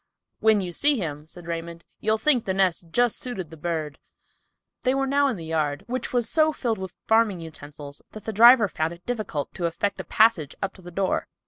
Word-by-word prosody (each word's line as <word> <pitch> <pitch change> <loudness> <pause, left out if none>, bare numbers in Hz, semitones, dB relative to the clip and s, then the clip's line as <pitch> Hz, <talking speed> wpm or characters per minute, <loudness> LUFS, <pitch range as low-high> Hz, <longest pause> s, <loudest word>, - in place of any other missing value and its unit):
"When 220 -2 +4
you 180 -2 -4
see 285 - +2
him," 150 -6 -4
said 175 +1 -12
Raymond, 170 0 -6
"you'll 220 +1 +1
think 250 0 +2
the 190 - -1
nest 185 -3 +1
just 240 +5 +2
suited 195 -10 -5
the - - -9
bird." 155 -3 -4 0.8
They 255 +1 +1
were 270 0 +1
now 280 +1 +2
in 260 - -1
the 165 - -8
yard, 155 -3 -1
which 250 0 -3
was 240 -2 +1
so 310 +5 +3
filled 230 -8 -2
with 190 -1 -7
farming 220 -4 +3
utensils 145 -2 -9
that 215 - -9
the 220 - -4
driver 235 +1 +8
found 160 -1 -2
it 170 +1 -16
difficult 215 -12 -3
to 175 -2 -1
effect 200 +4 -2
a - - -3
passage 215 -10 +3
up 195 - -3
to 190 - -16
the 175 - -10
door. 190 +2 -1
190 Hz, 215 wpm, -25 LUFS, 165-230 Hz, 0.8 s, driver